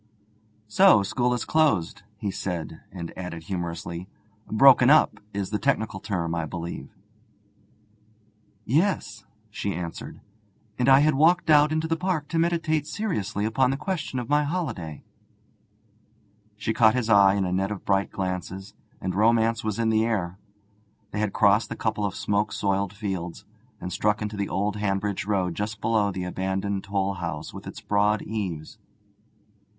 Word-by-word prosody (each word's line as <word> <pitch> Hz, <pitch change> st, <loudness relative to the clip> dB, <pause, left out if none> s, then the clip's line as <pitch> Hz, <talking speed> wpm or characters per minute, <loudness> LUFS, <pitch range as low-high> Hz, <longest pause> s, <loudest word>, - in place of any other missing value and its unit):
'So 185 Hz, -, +6 dB
school 120 Hz, +5 st, 0 dB
is 125 Hz, -, -1 dB
closed,' 155 Hz, -, +1 dB, 0.2 s
he 100 Hz, -1 st, -3 dB
said, 85 Hz, -4 st, -5 dB
and 85 Hz, -3 st, -7 dB
added 90 Hz, -3 st, -6 dB
humorously: 85 Hz, 0 st, -5 dB, 0.4 s
'"Broken 130 Hz, +2 st, +6 dB
up" 155 Hz, +1 st, +5 dB
is 100 Hz, -1 st, -3 dB
the 105 Hz, -, -1 dB
technical 110 Hz, -8 st, 0 dB
term, 85 Hz, -5 st, -2 dB
I 85 Hz, -1 st, -2 dB
believe.' 85 Hz, +2 st, -6 dB, 1.8 s
'Yes,' 120 Hz, -, 0 dB, 0.3 s
she 100 Hz, -2 st, -3 dB
answered, 85 Hz, -1 st, -6 dB, 0.6 s
'and 125 Hz, -, +3 dB
I 135 Hz, +1 st, +7 dB
had 155 Hz, +1 st, +4 dB
walked 160 Hz, +4 st, +3 dB
out 150 Hz, 0 st, +6 dB
into 155 Hz, +1 st, 0 dB
the 165 Hz, -, +1 dB
park 175 Hz, -4 st, -1 dB
to 165 Hz, -, 0 dB
meditate 165 Hz, -3 st, +1 dB
seriously 105 Hz, -, -2 dB
upon 125 Hz, +4 st, +2 dB
the 135 Hz, -, -1 dB
question 160 Hz, -6 st, -3 dB
of 120 Hz, -2 st, -3 dB
my 150 Hz, +2 st, +3 dB
holiday.' 130 Hz, -, -4 dB, 1.5 s
She 105 Hz, +2 st, -2 dB
caught 110 Hz, 0 st, +5 dB
his 125 Hz, -3 st, 0 dB
eye 100 Hz, -3 st, +6 dB
in 100 Hz, -2 st, 0 dB
a 90 Hz, -, -2 dB
net 95 Hz, +1 st, 0 dB
of 105 Hz, -2 st, -6 dB
bright 100 Hz, 0 st, +1 dB
glances, 95 Hz, +1 st, -4 dB, 0.3 s
and 95 Hz, -, -3 dB
romance 115 Hz, +2 st, +2 dB
was 110 Hz, -2 st, -2 dB
in 115 Hz, -1 st, +1 dB
the 110 Hz, 0 st, +3 dB
air. 100 Hz, -5 st, -2 dB, 0.7 s
They 105 Hz, -, -3 dB
had 105 Hz, -1 st, 0 dB
crossed 100 Hz, +2 st, +3 dB
a -, -, -2 dB
couple 110 Hz, -2 st, -1 dB
of 100 Hz, -, -3 dB
smoke 105 Hz, +1 st, 0 dB
soiled 100 Hz, -1 st, 0 dB
fields, 95 Hz, -5 st, -5 dB, 0.3 s
and 90 Hz, -, -5 dB
struck 105 Hz, 0 st, +1 dB
into 105 Hz, 0 st, -4 dB
the 100 Hz, -1 st, -2 dB
old 100 Hz, +2 st, -1 dB
Hanbridge 100 Hz, -1 st, -1 dB
road 95 Hz, -4 st, 0 dB
just 105 Hz, +3 st, -4 dB
below 110 Hz, -1 st, +1 dB
the 95 Hz, -1 st, -4 dB
abandoned 95 Hz, +2 st, -2 dB
toll 100 Hz, -1 st, -1 dB
house 80 Hz, -4 st, -5 dB
with -, -, -9 dB
its -, -, -8 dB
broad 105 Hz, +1 st, +1 dB
eaves. 95 Hz, -8 st, -5 dB
105 Hz, 160 wpm, -25 LUFS, 95-120 Hz, 1.8 s, I